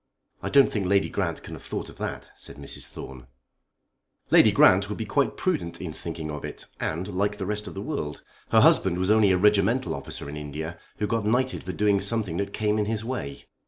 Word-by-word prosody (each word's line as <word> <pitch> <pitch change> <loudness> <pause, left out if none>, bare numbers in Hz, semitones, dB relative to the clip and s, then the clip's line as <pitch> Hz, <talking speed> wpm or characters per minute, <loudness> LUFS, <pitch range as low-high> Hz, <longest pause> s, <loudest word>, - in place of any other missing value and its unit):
"I - - -3
don't 140 -1 +6
think 100 -4 -1
Lady 100 +1 +3
Grant - - -2
can - - -8
have - - -8
thought - - -5
of - - -13
that," - - -5
said - - -9
Mrs. 70 -1 -4
Thorne. 65 -2 -10 1.0
"Lady - - +7
Grant 95 +2 +5
would 105 - -4
be 110 - -3
quite 135 +7 0
prudent 85 - -1
in 85 -4 -5
thinking 80 -1 -6
of 75 -1 -6
it - - -7
and 85 +4 -2
like 100 +2 -1
the 95 - -3
rest 105 +1 -3
of 85 - -8
the 100 - -4
world. 75 - -4 0.3
Her - - +5
husband 90 -2 +5
was 95 +3 +1
only 110 -2 +5
a 95 - +4
regimental 105 +6 +3
officer - - -6
in 75 +1 -6
India 75 +3 -6 0.2
who 105 - 0
got 115 +1 0
knighted 125 +5 +1
for 95 - -3
doing 100 +2 +2
something 100 -5 0
that 100 +1 -2
came 105 0 0
in 105 - +1
his 110 +1 -2
way. 115 - -5
100 Hz, 220 wpm, -26 LUFS, 85-105 Hz, 1.0 s, Lady